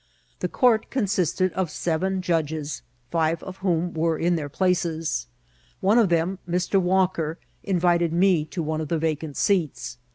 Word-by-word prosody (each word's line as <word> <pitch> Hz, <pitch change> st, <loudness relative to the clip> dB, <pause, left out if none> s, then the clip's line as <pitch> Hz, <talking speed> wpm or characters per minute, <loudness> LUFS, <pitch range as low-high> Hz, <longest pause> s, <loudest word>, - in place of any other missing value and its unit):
The -, -, -2 dB
oourt 230 Hz, -3 st, +3 dB
consists 200 Hz, -, 0 dB
of 185 Hz, -1 st, +1 dB
seven 185 Hz, +4 st, -1 dB
judges, 155 Hz, -4 st, -1 dB, 0.3 s
five 165 Hz, -1 st, +1 dB
of 185 Hz, 0 st, -8 dB
whom 175 Hz, -2 st, 0 dB
were 165 Hz, 0 st, +1 dB
in 175 Hz, +2 st, +1 dB
their 150 Hz, -3 st, -3 dB
places. 165 Hz, -, 0 dB, 0.5 s
One 210 Hz, +5 st, +4 dB
of 215 Hz, -5 st, +4 dB
them, 175 Hz, +3 st, +1 dB
Mr. 180 Hz, +3 st, +1 dB
Walker, 180 Hz, -3 st, +1 dB, 0.3 s
invited 175 Hz, -3 st, +2 dB
me 175 Hz, -2 st, +3 dB
to 165 Hz, +2 st, -4 dB
one 155 Hz, 0 st, -2 dB
of 155 Hz, -, -4 dB
the 165 Hz, -, 0 dB
vacant 155 Hz, -2 st, -2 dB
seats. 165 Hz, -10 st, 0 dB
170 Hz, 155 wpm, -24 LUFS, 160-185 Hz, 0.5 s, One